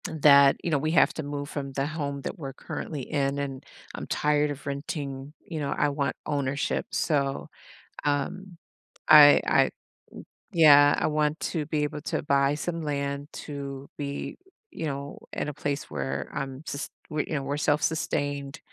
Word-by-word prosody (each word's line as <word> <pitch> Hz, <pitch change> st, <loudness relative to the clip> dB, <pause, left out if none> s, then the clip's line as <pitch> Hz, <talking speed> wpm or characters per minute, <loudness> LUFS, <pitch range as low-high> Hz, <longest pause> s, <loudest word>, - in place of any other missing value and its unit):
That, 140 Hz, -4 st, +6 dB
you 170 Hz, -, -1 dB
know, 145 Hz, -, +3 dB
we 155 Hz, +3 st, -1 dB
have 165 Hz, -, +4 dB
to 160 Hz, -, -4 dB
move 145 Hz, 0 st, -4 dB
from 140 Hz, -2 st, -5 dB
the 135 Hz, +1 st, -1 dB
home 145 Hz, -2 st, -3 dB
that -, -, -6 dB
we're 135 Hz, -3 st, -6 dB
currently 145 Hz, -1 st, -6 dB
in, 140 Hz, 0 st, -1 dB
and 135 Hz, -2 st, -4 dB, 0.3 s
I'm -, -, -6 dB
tired 150 Hz, 0 st, +2 dB
of 145 Hz, -1 st, -6 dB
renting, 140 Hz, -1 st, -5 dB
you 160 Hz, -3 st, -5 dB
know, 140 Hz, -2 st, -2 dB
I -, -, +2 dB
want 140 Hz, -1 st, -1 dB
ownership, 140 Hz, 0 st, -1 dB
so, 140 Hz, -3 st, 0 dB, 0.5 s
um, 165 Hz, +6 st, -2 dB, 0.5 s
I 145 Hz, -1 st, +9 dB
I -, -, +4 dB, 0.8 s
yeah, 145 Hz, -3 st, +7 dB
I -, -, 0 dB
want 150 Hz, 0 st, 0 dB
to 160 Hz, -4 st, -2 dB
be 155 Hz, -1 st, 0 dB
able 150 Hz, 0 st, -3 dB
to 160 Hz, -1 st, -2 dB
buy 140 Hz, 0 st, +2 dB
some 165 Hz, +2 st, -3 dB
land 140 Hz, -1 st, -2 dB, 0.2 s
to 140 Hz, -2 st, -6 dB
be, 140 Hz, -1 st, -5 dB, 0.3 s
you 160 Hz, -, -4 dB
know, 140 Hz, 0 st, -5 dB
in -, -, -2 dB
a -, -, -5 dB
place 145 Hz, 0 st, -2 dB
where 70 Hz, -1 st, -3 dB
I'm 135 Hz, +1 st, -5 dB
sus 145 Hz, -2 st, -4 dB, 0.2 s
we 150 Hz, 0 st, -1 dB
you -, -, -5 dB
know, 140 Hz, -, -1 dB
we're 140 Hz, +1 st, -2 dB
self-sustained, 145 Hz, -1 st, -1 dB
145 Hz, 170 wpm, -27 LUFS, 140-150 Hz, 0.8 s, I